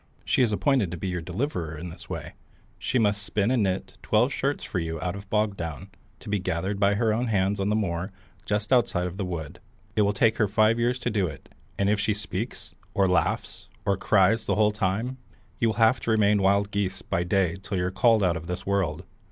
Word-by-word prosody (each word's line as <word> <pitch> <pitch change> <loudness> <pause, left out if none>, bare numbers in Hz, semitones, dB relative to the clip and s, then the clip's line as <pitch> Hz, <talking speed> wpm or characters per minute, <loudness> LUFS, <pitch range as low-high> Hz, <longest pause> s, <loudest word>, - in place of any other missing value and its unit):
She - - +2
is 120 -3 +3
appointed 125 - +2
to 90 - -5
be 95 +3 -3
your 90 -1 -2
deliverer 85 - -3
in 85 +3 -6
this 85 0 -11
way. - - -5 0.5
She 130 - 0
must 105 -3 +2
spin 100 +2 0
and 130 -3 +2
knit 95 -2 -2
twelve 120 +6 +2
shirts 140 +2 -1
for 90 - -3
you 80 -1 -3
out 90 +3 -2
of 100 0 -10
bog 105 -1 +1
down, 85 +2 -6 0.3
to - - -13
be 105 -1 0
gathered 95 +3 -2
by 100 0 +3
her 110 0 +2
own 120 +3 0
hands 100 -2 +1
on 100 +1 0
the 105 - +2
moor 90 -2 -1 0.3
just 105 +4 0
outside 100 -7 +2
of 90 +1 -5
the 100 - -2
wood. 80 -5 -5 0.4
It 110 - +3
will 100 0 +3
take 110 +2 +3
her 105 - +3
five 110 +3 +3
years 120 +1 +1
to 125 - -2
do 100 -4 +1
it, 70 -4 -10 0.3
and 100 - +1
if 105 0 +2
she 105 +1 +1
once 105 - -6
speaks, 100 0 -5 0.2
or 100 -3 +4
laughs, 90 - -1 0.2
or 100 -1 +2
cries 100 +3 +3
the - - +2
whole 105 0 +4
time, 110 +5 -2 0.4
you 115 - +3
will 110 - 0
have 115 +2 +4
to - - -4
remain 105 -2 +4
wild 100 +1 +2
geese 100 -2 -2
by 85 - -1
day 90 -1 +1
till 100 0 -3
you're 90 0 0
called 110 +1 +4
out 90 -2 +2
of 80 0 -6
the 90 +1 -3
world. 100 -3 0
100 Hz, 235 wpm, -26 LUFS, 90-110 Hz, 0.5 s, or